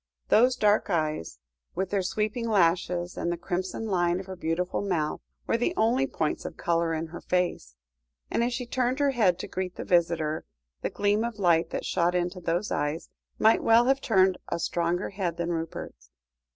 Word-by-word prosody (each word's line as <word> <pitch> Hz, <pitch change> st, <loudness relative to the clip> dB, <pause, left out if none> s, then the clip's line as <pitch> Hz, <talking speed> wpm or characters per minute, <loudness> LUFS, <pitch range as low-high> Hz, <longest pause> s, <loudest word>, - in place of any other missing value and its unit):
Those 250 Hz, +3 st, +5 dB
dark 210 Hz, 0 st, +2 dB
eyes 155 Hz, -, -1 dB, 0.4 s
with 190 Hz, +1 st, -2 dB
their 200 Hz, -1 st, +1 dB
sweeping 215 Hz, +5 st, -2 dB
lashes, 175 Hz, -2 st, +1 dB
and 170 Hz, -, -1 dB
the 175 Hz, -, -2 dB
crimson 185 Hz, +4 st, -3 dB
line 175 Hz, -3 st, +1 dB
of 190 Hz, -, -7 dB
her 190 Hz, 0 st, -7 dB
beautiful 175 Hz, +1 st, -1 dB
mouth, 170 Hz, -7 st, -1 dB, 0.2 s
were -, -, +1 dB
the 295 Hz, +10 st, 0 dB
only 245 Hz, +5 st, +2 dB
points 155 Hz, -, -2 dB
of -, -, -7 dB
colour 170 Hz, -1 st, +1 dB
in 160 Hz, +1 st, -2 dB
her 165 Hz, +2 st, -9 dB
face, 180 Hz, -, -1 dB, 0.6 s
and 235 Hz, -, +1 dB
as 240 Hz, -, 0 dB
she 250 Hz, +1 st, -3 dB
turned 250 Hz, +1 st, 0 dB
her 285 Hz, -1 st, +2 dB
head 205 Hz, -9 st, +3 dB
to -, -, -6 dB
greet 185 Hz, -1 st, -4 dB
the -, -, -6 dB
visitor, 165 Hz, -3 st, +1 dB, 0.4 s
the -, -, -1 dB
gleam 205 Hz, +2 st, +1 dB
of 235 Hz, -2 st, -4 dB
light 170 Hz, -4 st, +3 dB
that -, -, -4 dB
shot 175 Hz, 0 st, +1 dB
into 180 Hz, +1 st, -1 dB
those 175 Hz, +5 st, -1 dB
eyes, 145 Hz, +3 st, -2 dB, 0.3 s
might 220 Hz, +1 st, +4 dB
well 230 Hz, +1 st, +5 dB
have 270 Hz, +1 st, +2 dB
turned 190 Hz, -5 st, +3 dB
a -, -, -1 dB
stronger 170 Hz, +2 st, -1 dB
head 180 Hz, -4 st, -3 dB
than 170 Hz, 0 st, -2 dB
Rupert's. 160 Hz, -, -6 dB
180 Hz, 190 wpm, -27 LUFS, 170-215 Hz, 0.6 s, Those